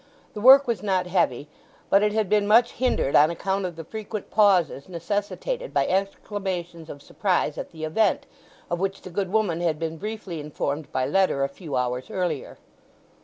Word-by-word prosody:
The 210 - -6
work 270 +4 +8
was 230 -6 -1
not 190 -3 0
heavy, 150 -7 0 0.4
but 195 - +6
it 210 0 +2
had 215 -1 0
been 205 +1 +2
much 230 +3 +5
hindered 245 - 0
on 150 +2 +6
account 190 +3 -2
of 175 - -8
the 165 - -7
frequent 215 +2 -7
pauses 185 -8 +3
necessitated 205 - -3
by - - +3
exclamations 185 -3 -3
of 145 0 -9
surprise 180 -6 0
at - - -6
the 160 -1 -9
event, 190 +6 +1 0.5
of 175 - -1
which 195 +1 -3
the 185 - -9
good 190 +1 -2
woman 200 -6 +1
had 165 -3 0
been 165 0 -4
briefly 205 -4 -6
informed 150 0 -4
by 130 - 0
letter 150 -2 +2
a - - +2
few 145 +2 -7
hours 125 0 -2
earlier. 175 -6 -3
185 Hz, 180 wpm, -25 LUFS, 160-205 Hz, 0.5 s, work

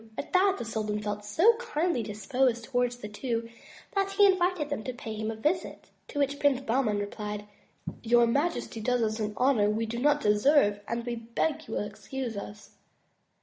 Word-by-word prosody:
At - - -6
that 385 +1 +4
the - - -5
sultan 215 -2 -2
felt 210 0 -4
so 330 - +4
kindly 345 - -1
disposed 230 +4 0
towards 245 0 0
the 210 - -7
two 230 +2 -3 0.5
that 390 0 0
he 405 +1 +6
invited 365 -5 +2
them 250 -7 -2
to 255 - -3
pay 225 -2 -7
him 215 0 -3
a 225 - -3
visit, 305 +11 -2 0.2
to - - -8
which 285 0 0
Prince 280 -2 +3
Bahman 240 -4 +1
replied: 210 0 -4 0.6
Your 240 +1 +4
majesty 280 -2 -1
does 245 +1 +1
us 220 0 -1
an 210 -1 -2
honor 245 -6 +3
we 220 +2 0
do 235 +2 -4
not 295 +3 +3
deserve 210 0 +4
and 235 0 -3
we 240 -1 -2
beg 230 +7 -2
you 220 - -4
will - - 0
excuse 245 +2 -5
us." 205 +1 -8
235 Hz, 190 wpm, -28 LUFS, 215-285 Hz, 0.6 s, he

